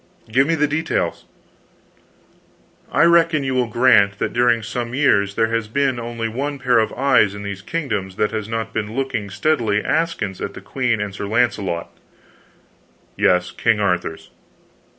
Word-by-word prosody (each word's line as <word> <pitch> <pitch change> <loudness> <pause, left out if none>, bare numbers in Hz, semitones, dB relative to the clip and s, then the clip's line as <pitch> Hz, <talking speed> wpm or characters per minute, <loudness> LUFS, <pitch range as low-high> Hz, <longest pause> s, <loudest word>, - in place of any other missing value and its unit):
"Give 135 +5 +3
me 165 - +2
the 150 -1 +2
details." 150 - -2 1.7
"I - - +3
reckon 165 -3 +4
you 130 -1 -1
will 125 -2 +1
grant 110 -4 +4
that - - -2
during 120 -1 +2
some 120 +2 -4
years 100 -8 +2
there 115 0 +1
has 115 -1 -1
been 135 +1 0
only 115 -1 -4
one 140 +6 -3
pair 125 -3 +2
of 110 - 0
eyes 125 -6 +3
in 100 - -7
these 100 -1 -5
kingdoms 105 - -3
that 105 +1 0
has 110 -1 -4
not 115 0 -3
been 110 0 -3
looking 125 -6 -2
steadily 115 -2 0
askance 155 - -1
at - - -5
the - - -7
queen 120 -4 -1
and 105 -1 -4
Sir 100 +1 -5
Launcelot 105 -6 -1 0.6
" - - -36
"Yes, 90 0 +3
King 115 -2 +1
Arthur's." 90 -5 -2
115 Hz, 165 wpm, -20 LUFS, 105-135 Hz, 1.7 s, reckon